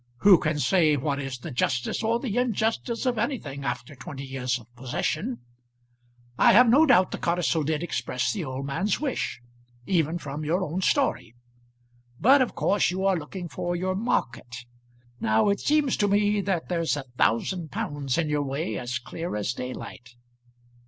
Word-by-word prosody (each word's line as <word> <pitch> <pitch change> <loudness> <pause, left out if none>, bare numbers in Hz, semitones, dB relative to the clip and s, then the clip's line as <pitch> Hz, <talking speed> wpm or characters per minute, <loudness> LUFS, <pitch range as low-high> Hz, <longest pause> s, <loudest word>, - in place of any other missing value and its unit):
Who 195 -4 +7
can 155 -1 -1
say 155 -1 +3
what 140 +1 -1
is 135 -2 -4
the 145 +6 -8
justice 125 - -1
or 230 +1 +1
the 235 -5 -3
injustice 230 0 0
of 245 -3 0
anything 220 - -3
after 125 +1 -4
twenty 135 +1 -8
years 130 -2 -2
of 120 - -14
possession? 155 - -3 1.0
I - - +6
have 245 +4 +7
no 285 +8 +6
doubt 185 -8 +5
the - - -4
codicil 170 -2 +1
did 155 +2 -1
express 125 -5 -1
the 200 -5 -3
old 135 -1 -5
man's 190 +9 -1
wish, 265 - -3 0.4
even 165 -3 +1
from 150 -2 -6
your 170 +5 0
own 175 +3 -3
story. 190 - 0 0.8
But 270 +3 +6
of 255 - 0
course 200 -1 +2
you 190 +2 -2
are 195 -1 +3
looking 175 +3 -6
for 175 +2 -3
your 185 +2 -1
market. 120 - -2 0.5
Now 110 - +2
it 200 - +1
seems 295 -3 +2
to 205 - +2
me 205 +1 +2
that 190 -4 -2
there's 165 -4 0
a 145 - -4 0.2
thousand 160 +9 +1
pounds 140 -1 -3
in 165 -2 +1
your 150 -1 0
way 145 +5 -3
as 120 0 -3
clear 165 +4 -6
as 105 +2 -1
daylight." 125 -1 -8
165 Hz, 170 wpm, -26 LUFS, 135-200 Hz, 1.0 s, Who